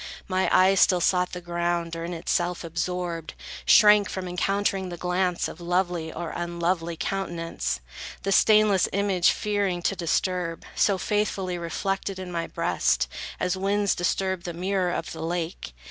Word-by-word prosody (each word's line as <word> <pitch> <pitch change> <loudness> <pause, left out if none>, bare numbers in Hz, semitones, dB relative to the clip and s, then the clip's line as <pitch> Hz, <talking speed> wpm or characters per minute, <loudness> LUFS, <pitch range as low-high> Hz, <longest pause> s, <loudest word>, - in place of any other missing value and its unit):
My 185 0 +1
eye 185 +1 +5
still 185 -1 +4
sought 180 +1 +2
the 180 - -5
ground, 170 -1 -2
or 165 - -5
in 170 - -4
itself 175 +1 -1
Absorbed, 170 0 -3 0.3
shrank 210 -1 +6
from 185 -1 -4
encountering 195 +1 0
the 175 - -6
glance 180 0 0
Of - - -10
lovely 175 -2 -1
or 170 0 -5
unlovely 170 -1 -2
countenance; 165 - -3 0.4
The 195 - -1
stainless 210 -2 +5
image 195 -3 +3
fearing 200 -4 -1
to 195 - +1
disturb, 175 -1 -1
So 200 -3 +2
faithfully 190 -3 -1
reflected 195 +3 -3
in 185 -1 -6
my 165 -1 -2
breast; 170 0 +1 0.3
As 180 - 0
winds 200 +1 +1
disturb 190 +1 -1
the 175 0 -5
mirror 185 +1 0
of 165 - -3
the 160 - -7
lake. 165 - -3
180 Hz, 150 wpm, -26 LUFS, 170-195 Hz, 0.4 s, shrank